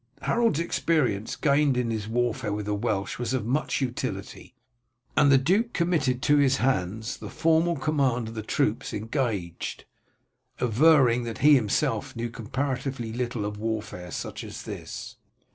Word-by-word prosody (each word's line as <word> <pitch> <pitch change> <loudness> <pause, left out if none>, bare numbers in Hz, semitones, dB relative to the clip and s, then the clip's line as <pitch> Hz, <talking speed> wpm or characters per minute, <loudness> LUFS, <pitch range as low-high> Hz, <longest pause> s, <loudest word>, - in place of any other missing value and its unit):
Harold's 230 -9 +2
experience 150 -11 0
gained 140 -3 +2
in 120 -2 0
his 110 -2 -3
warfare 115 -2 -1
with 105 0 -3
the 105 - -1
Welsh 100 0 -2
was 120 +1 -1
of 125 - -2
much 140 +3 0
utility, 125 0 -4 0.6
and 145 -2 +5
the 135 - +7
duke 195 - +1
committed 145 -7 +1
to 145 0 +4
his 140 -2 +4
hands 110 -1 -1
the - - -8
formal 165 +1 +2
command 135 -6 0
of - - -9
the 110 - -4
troops 110 - -1
engaged, 105 - -3 0.7
averring 125 0 +4
that 115 -1 -5
he 150 - +9
himself 115 -7 +1
knew 115 0 -3
comparatively 130 0 -3
little 120 -3 -2
of 105 0 -4
warfare 110 -5 -4
such - - -5
as - - -8
this. - - -7
125 Hz, 150 wpm, -26 LUFS, 110-145 Hz, 0.7 s, he